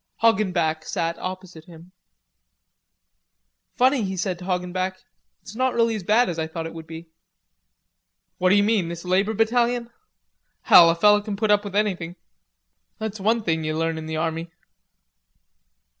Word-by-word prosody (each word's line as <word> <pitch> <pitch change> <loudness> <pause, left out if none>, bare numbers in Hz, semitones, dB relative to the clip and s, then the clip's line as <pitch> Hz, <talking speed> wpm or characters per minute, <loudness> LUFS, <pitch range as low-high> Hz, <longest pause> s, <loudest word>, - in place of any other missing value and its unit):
Hoggenback 180 -8 +1
sat 170 -3 -3
opposite 185 -3 -8
him. 170 0 -15 1.8
"Funny," 260 +1 +3
he 190 -2 -3
said 180 -1 -2
to 180 - -9
Hoggenback, 185 0 -2 0.5
"it's 215 - -11
not 255 +1 0
really 230 -1 +2
as 215 - -4
bad 215 +7 +3
as 170 -2 -4
I 160 - -2
thought 160 0 -6
it 165 - -7
would 165 -1 -10
be." 165 +1 -9 1.3
"What 185 - +3
d'you 205 +2 +4
mean, 205 -5 +1
this 170 +1 -7
labor 195 +4 +1
battalion? 235 +2 +1 0.7
Hell, 170 -1 +8
a 165 - +2
feller 210 +4 +4
can 205 -1 -5
put 215 +1 0
up 205 0 +3
with 200 -2 -7
anything; 185 -5 -1 0.8
that's 220 -1 -5
one 220 +3 +1
thing 160 -3 -1
you 155 0 -2
learn 165 0 -1
in 160 - -8
the 160 0 -4
army." 165 +1 -3
185 Hz, 160 wpm, -23 LUFS, 165-215 Hz, 1.8 s, Hell